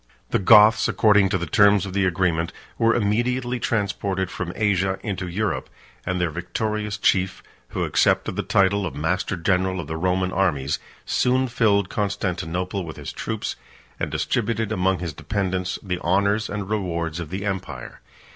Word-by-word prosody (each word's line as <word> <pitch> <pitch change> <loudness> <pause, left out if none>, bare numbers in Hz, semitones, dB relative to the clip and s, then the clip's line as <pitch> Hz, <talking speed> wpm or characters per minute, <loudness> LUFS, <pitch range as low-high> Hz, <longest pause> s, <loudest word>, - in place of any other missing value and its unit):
The - - +2
Goths, 110 +2 +7
according 105 -3 +4
to 95 - +1
the 85 - -3
terms 100 +2 +4
of 95 - -6
the 100 -1 +2
agreement, 85 -2 0 0.3
were 115 0 +4
immediately 120 +3 0
transported 100 -4 -1
from 85 -2 -4
Asia 95 -3 +1
into 95 -4 -3
Europe; 95 +1 -2 0.4
and 90 -1 0
their 90 -2 0
victorious 105 +5 -3
chief, 95 -2 +1 0.2
who - - -3
accepted - - +2
the - - 0
title 100 0 +2
of - - -7
master 90 +6 -1
general 95 +2 +1
of 85 - -4
the 80 +2 -4
Roman 90 +2 0
armies, 75 -9 0 0.3
soon 130 +1 +2
filled 105 -5 +2
Constantinople 95 -2 -2
with 80 -2 -8
his - - -7
troops, - - -4 0.4
and - - -1
distributed 115 -1 -1
among 95 -2 +1
his 85 -3 -5
dependants 95 0 -2
the 90 -3 -3
honors 100 +5 +1
and 100 -2 -4
rewards 85 -6 -2
of 85 -3 -5
the 95 +2 -4
empire. 90 -10 -5
95 Hz, 160 wpm, -23 LUFS, 90-105 Hz, 0.4 s, Goths